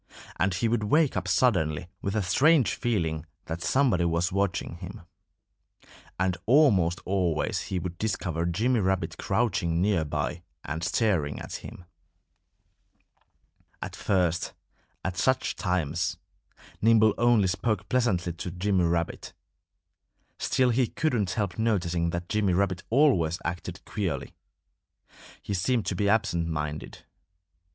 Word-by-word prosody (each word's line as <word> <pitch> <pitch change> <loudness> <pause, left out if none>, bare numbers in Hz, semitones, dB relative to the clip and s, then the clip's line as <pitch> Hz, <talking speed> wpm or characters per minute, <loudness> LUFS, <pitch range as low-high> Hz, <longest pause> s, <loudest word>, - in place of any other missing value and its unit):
And 90 0 +2
he 115 - +1
would 110 -2 0
wake 150 +6 +3
up - - -2
suddenly 85 - +2
with 100 +2 -2
a 105 - +1
strange 135 - +4
feeling 85 -10 -1 0.2
that 85 +1 -5
somebody 120 - +2
was 85 +2 +1
watching 95 -3 -1
him. 95 +4 -9 1.2
And 95 -1 +1
almost 100 - +4
always 90 -5 0
he 95 - -1
would 90 -1 -5
discover 90 -6 -1
Jimmy 115 +8 +1
Rabbit 95 -2 -1
crouching 85 -8 0
near 95 -3 +2
by 75 - -3 0.2
and 80 +3 -4
staring 85 -5 +1
at - - -6
him. 90 - -11 1.9
At - - -6
first, 90 -4 0 0.5
at 95 0 -2
such 130 +4 +1
times, 90 -3 -1 0.6
Nimble 110 -1 +5
only 120 -4 +4
spoke 105 +4 -1
pleasantly 95 -9 +1
to 85 +2 -6
Jimmy 90 +1 +1
Rabbit. 85 0 -2 1.1
Still 125 -1 +2
he 125 +1 +2
couldn't 120 - 0
help 100 0 -2
noticing 90 -7 +1
that 85 +1 -4
Jimmy 105 -4 +1
Rabbit 90 -1 +1
always 110 - +3
acted 85 +1 -5
queerly. 90 -9 -3 1.1
He 100 - -3
seemed 110 +5 0
to 95 - -1
be 100 +2 +1
absent 100 -6 +1
minded. 75 -5 -5
95 Hz, 130 wpm, -27 LUFS, 85-110 Hz, 1.9 s, Nimble